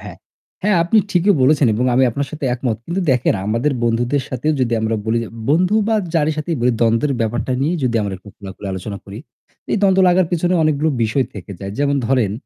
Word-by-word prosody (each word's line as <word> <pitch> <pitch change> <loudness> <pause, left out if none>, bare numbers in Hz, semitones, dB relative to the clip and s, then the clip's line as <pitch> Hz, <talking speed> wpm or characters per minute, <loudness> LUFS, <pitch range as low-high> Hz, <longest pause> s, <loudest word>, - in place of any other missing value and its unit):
হ্যাঁ, - - -10 0.5
হ্যাঁ, 205 -2 +2
আপনি 175 +6 +3
ঠিকই 185 +2 +3
বলেছেন 145 +1 +4
এবং 120 +4 0
আমি 130 - +4
আপনার 140 +4 -3
সাথে 155 -2 -6
একমত। 120 -3 -2
কিন্তু 175 +3 -2
দেখেন, 125 -1 +1
আমাদের 115 +7 0
বন্ধুদের 120 +4 0
সাথেও 135 +5 -1
যদি 120 -2 0
আমরা 110 0 0
বলি, 110 +1 0
যে - - -9 0.2
বন্ধু 180 +6 +3
বা 225 - +2 0.2
যারই 155 -1 +2
সাথেই 160 +2 -2
বলি 125 +1 +2
দ্বন্দ্বের 115 +5 +2
ব্যাপারটা 115 +3 -1
নিয়ে 160 +5 +1
যদি 120 -2 +1
আমরা 100 -2 -3
একটু 100 - -16
খোলাখুলি 100 0 -9
আলোচনা 100 +2 -5
করি, 100 +1 -9 0.5
এই - - +2
দ্বন্দ্ব 190 -1 +4
লাগার 180 -1 +3
পিছনে 175 +1 +1
অনেকগুলো 155 0 +1
বিষয় 115 +4 +1
থেকে 100 -1 -9
যায়। 100 0 -5
যেমন 140 0 +1
ধরেন 125 -6 +1
130 Hz, 205 wpm, -19 LUFS, 115-155 Hz, 0.5 s, বলেছেন